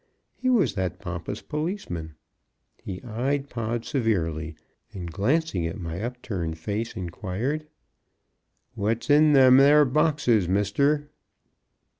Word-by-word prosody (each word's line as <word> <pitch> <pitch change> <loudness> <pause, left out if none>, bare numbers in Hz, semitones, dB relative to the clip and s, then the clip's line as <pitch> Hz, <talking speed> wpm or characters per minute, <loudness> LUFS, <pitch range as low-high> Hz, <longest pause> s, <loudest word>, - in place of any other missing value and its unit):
He 255 - -2
was 210 - +3
that 95 -3 -2
pompous 90 +2 -6
policeman. 150 - -4 0.7
He 95 -2 -6
eyed 135 +5 -2
Pod 115 0 -3
severely, 80 - -1 0.4
and 90 -4 -6
glancing 105 - 0
at 85 - -6
my 85 +1 -5
up 125 +2 -5
turned 85 -6 -3
face, 105 +8 -4
inquired: 105 - -3 1.1
"What's 115 +8 -1
in 150 +1 +6
them 130 -2 +7
there 145 +2 +7
boxes, 140 - +2
Mister?" 140 +10 +1
115 Hz, 115 wpm, -25 LUFS, 90-145 Hz, 1.1 s, them